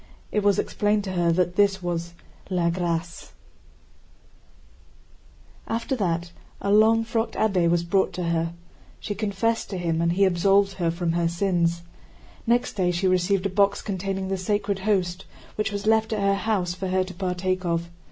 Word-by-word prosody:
It 210 - +1
was 200 -1 +3
explained 205 0 0
to 190 - -4
her 175 -2 +2
that 175 +1 0
this 195 -2 +3
was 170 -1 -3 0.3
la 175 -3 +1
grâce. 170 -1 -3 2.3
After 230 +3 -1
that 170 -5 -1 0.3
a 200 - -1
long 220 +2 +5
frocked 225 0 -2
abbé 185 -6 +2
was 170 0 +2
brought 190 +3 +1
to 180 - -3
her. 165 0 -1 0.5
She 210 - -4
confessed 215 +2 -1
to 190 - -4
him, 165 -2 -1
and 170 0 +2
he 195 +2 +4
absolved 195 +2 +3
her 170 -3 +1
from 170 0 -1
her 170 0 +1
sins. 170 -1 0 0.6
Next 240 +1 +2
day 185 -3 +1
she 175 +2 -1
received 185 +1 +1
a - - +2
box 200 +1 +2
containing 195 -1 -3
the 195 - -1
Sacred 200 +1 -1
Host, 190 -3 0 0.3
which 215 +1 -2
was 205 0 -4
left 220 0 +2
at 215 - -1
her 200 0 +2
house 195 -3 0
for 190 +1 -4
her 185 0 +1
to 185 0 -8
partake 185 0 -2
of. 170 -1 -2
185 Hz, 170 wpm, -25 LUFS, 175-205 Hz, 2.3 s, long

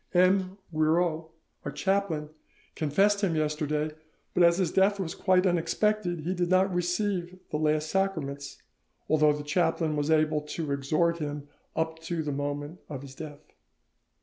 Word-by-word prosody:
M. 185 +1 +3 0.2
Guiraut, 160 +1 +1 0.3
our - - -4
chaplain, 190 -6 0 0.4
confessed 195 +7 +2
him 185 -5 +1
yesterday, 150 0 0 0.4
but - - +2
as 170 0 +6
his 185 -4 +1
death 200 +1 +3
was 175 -4 -2
quite 185 -1 +3
unexpected 180 +1 +1
he 175 +4 -1
did 175 -1 -1
not 185 +1 +3
receive 180 0 -1
the - - 0
last 155 0 +1
sacraments, 150 -8 -2 0.4
although 155 -1 +4
the 150 0 -5
chaplain 160 0 +1
was 145 +1 -1
able 155 -1 +3
to 150 0 -4
exhort 155 +5 +1
him 145 -1 -4 0.3
up 160 0 -1
to 165 0 -3
the 150 - -2
moment 145 +3 -4
of 140 -3 -6
his 135 -1 -10
death. 150 +1 -10
160 Hz, 150 wpm, -28 LUFS, 150-185 Hz, 0.4 s, as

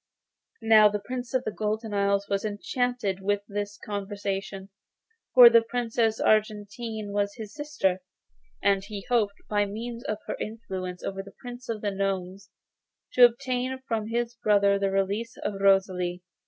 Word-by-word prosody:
Now 215 -1 +7
the 210 - -1
Prince 250 -1 -5
of 255 - +2
the 215 - -3
Golden 215 +1 -3
Isle 200 0 +2
was 200 0 -1
enchanted 215 -1 -2
with 205 +1 0
this 205 0 -4
conversation, 200 -1 -4 0.7
for 250 -2 +11
the 230 -1 +7
Princess 225 -1 0
Argentine 215 0 0
was 205 0 -1
his 215 -3 -8
sister, 295 -11 -1 0.6
and 195 -1 +3
he 200 -1 -7
hoped, 215 -5 +2
by 205 -1 +1
means 230 +3 -6
of 215 - -2
her - - -3
influence 190 -5 -5
over 195 0 -3
the 195 0 -14
Prince 245 0 -9
of 220 -2 -3
the 205 - -1
Gnomes, 195 0 -3 0.6
to 250 - +9
obtain 250 +2 -1
from 220 -2 -1
his 235 +1 -1
brother 200 -3 +3
the 195 0 +1
release 200 +4 -1
of 195 -1 -4
Rosalie. 185 -2 +2
205 Hz, 155 wpm, -27 LUFS, 195-230 Hz, 0.7 s, for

